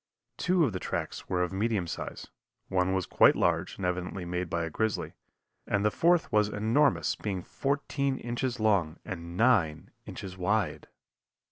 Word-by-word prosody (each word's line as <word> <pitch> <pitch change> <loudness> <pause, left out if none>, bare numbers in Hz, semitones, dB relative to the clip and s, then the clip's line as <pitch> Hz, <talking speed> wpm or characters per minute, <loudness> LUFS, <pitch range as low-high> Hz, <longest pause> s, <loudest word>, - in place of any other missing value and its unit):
Two 180 -2 +3
of 115 - -2
the 90 - -3
tracks - - -4
were 90 0 +1
of 90 - -3
medium 105 -1 0
size, 85 - -6 0.4
one 90 0 +1
was 95 -2 0
quite - - +5
large - - 0
and 95 - -3
evidently 90 +1 -2
made 90 0 -3
by 85 0 -1
a - - -4
grizzly, 110 +4 -1 0.5
and 105 0 +1
the 105 - +4
fourth 170 +5 +3
was 105 -1 +3
enormous, 115 +8 +2
being 95 -4 -4
fourteen 140 -1 -1
inches 120 +1 -3
long 95 -7 +2
and 85 -1 -6
nine 95 -10 +2 0.2
inches 95 -1 -7
wide. 105 +4 0
100 Hz, 160 wpm, -29 LUFS, 90-120 Hz, 0.5 s, quite